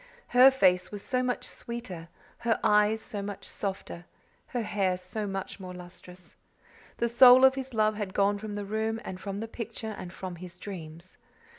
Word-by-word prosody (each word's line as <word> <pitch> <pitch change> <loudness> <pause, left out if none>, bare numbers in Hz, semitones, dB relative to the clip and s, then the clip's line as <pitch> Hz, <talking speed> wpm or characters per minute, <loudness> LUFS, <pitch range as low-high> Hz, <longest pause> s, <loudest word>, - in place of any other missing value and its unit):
Her 250 +2 +8
face 185 -9 +3
was 205 -1 -5
so 255 -1 0
much 250 -1 -1
sweeter, 195 -9 -6 0.3
her 230 -1 +1
eyes 210 +1 +4
so 205 - -5
much 200 0 -6
softer, 190 -3 -5 0.4
her 240 -2 -2
hair 195 -3 0
so 195 +4 -5
much 195 0 -5
more 185 -1 -8
lustrous. 180 0 -12 0.6
The 235 - +1
soul 250 +2 +8
of 265 - +6
his 265 -2 -6
love 215 -1 +2
had 200 -3 -4
gone 200 0 +2
from 210 0 -6
the 205 -1 -4
room 220 +2 -1
and 185 - -6
from 200 +1 -5
the 225 - -4
picture 225 -1 -6
and 175 - -7
from 185 -1 -7
his 175 0 -10
dreams. 170 -2 -9
205 Hz, 180 wpm, -28 LUFS, 185-225 Hz, 0.6 s, Her